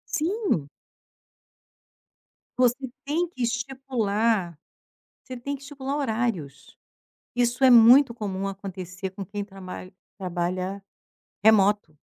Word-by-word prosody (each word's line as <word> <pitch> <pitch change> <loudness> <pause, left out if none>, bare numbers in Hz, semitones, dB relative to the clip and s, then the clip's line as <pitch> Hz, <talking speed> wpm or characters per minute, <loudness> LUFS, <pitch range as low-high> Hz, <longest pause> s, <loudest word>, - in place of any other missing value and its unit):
Sim. 335 - 0 1.9
Você 255 +2 +2 0.2
tem 325 +5 0
que 255 - -9
estipular. 230 - 0 0.7
Você 255 -1 -8
tem 280 +4 -4
que 275 - -13
estipular 280 0 -4
horários. 220 - -3 0.6
Isso 245 +2 +1
é 260 - +8
muito 240 +2 +8
comum 195 -4 -3
acontecer 190 -1 -6
com 195 +1 -7
quem 205 +1 -4
tramalh 185 -1 -9 0.3
trabalha 185 +1 -3 0.6
remoto. 205 -6 +4
220 Hz, 100 wpm, -25 LUFS, 190-260 Hz, 1.9 s, é